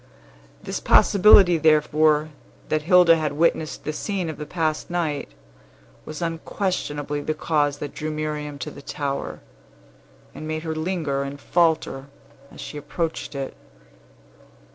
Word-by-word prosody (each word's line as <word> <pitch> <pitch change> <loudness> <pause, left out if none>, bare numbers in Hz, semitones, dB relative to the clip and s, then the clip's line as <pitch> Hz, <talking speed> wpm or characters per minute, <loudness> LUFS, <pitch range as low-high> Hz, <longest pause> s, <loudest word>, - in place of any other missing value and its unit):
This - - -4
possibility, 195 -4 +6
therefore, 155 0 +3 0.4
that 155 - +1
Hilda 175 0 +6
had 155 -2 -2
witnessed 155 0 0
the 155 - -3
scene 185 -1 -3
of 155 - -11
the 150 - -7
past 160 -3 -2
night, 165 - -2 0.8
was 155 +3 -6
unquestionably 165 -4 -3
the 155 +2 -2
cause 145 -2 0
that 145 -1 -6
drew 155 - -4
Miriam 150 -1 -4
to 135 - -6
the 140 - -11
tower, 140 -1 -4 0.9
and 155 - -8
made 155 0 -3
her 160 -1 -3
linger 155 -4 -2
and 140 +1 -5
falter 160 -5 +1 0.4
as - - -14
she 150 - -7
approached 155 +1 -4
it. 135 -1 -5
155 Hz, 135 wpm, -23 LUFS, 145-165 Hz, 0.9 s, possibility